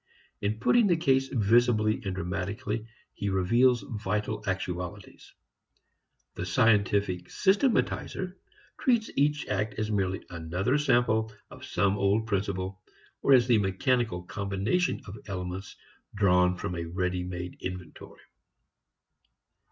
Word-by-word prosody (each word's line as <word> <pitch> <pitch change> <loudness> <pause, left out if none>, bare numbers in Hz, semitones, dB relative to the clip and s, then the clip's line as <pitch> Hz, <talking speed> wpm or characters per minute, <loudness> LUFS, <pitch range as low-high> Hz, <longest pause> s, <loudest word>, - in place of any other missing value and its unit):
In 105 +2 -1
putting 230 - +4
the 175 -3 +3
case 135 -4 +2
visibly 115 -1 +3
and 95 -3 -3
dramatically 100 +4 -3 0.3
he 100 - -3
reveals 115 +5 +3
vital 105 -1 -3
actualities. 90 -2 -5 1.0
The - - -5
scientific 100 -2 +2
systematizer 195 -3 +1 0.5
treats 235 -4 +2
each 145 +1 +1
act 105 +1 -1
as 110 +1 -2
merely 95 -2 -1
another 90 - -1
sample 110 -5 +2 0.2
of - - -12
some 100 0 +1
old 100 +3 +2
principle, 95 -2 -2 0.4
or 140 - +5
as 125 -2 +5
a 115 - +6
mechanical 100 0 0
combination 100 - -1
of 105 +2 -9
elements 95 0 -5 0.4
drawn 90 -2 +3
from 95 0 -4
a 85 -1 -3
ready 90 +1 -2
made 90 0 -6
inventory. 90 -3 -8
100 Hz, 115 wpm, -28 LUFS, 95-120 Hz, 1.0 s, a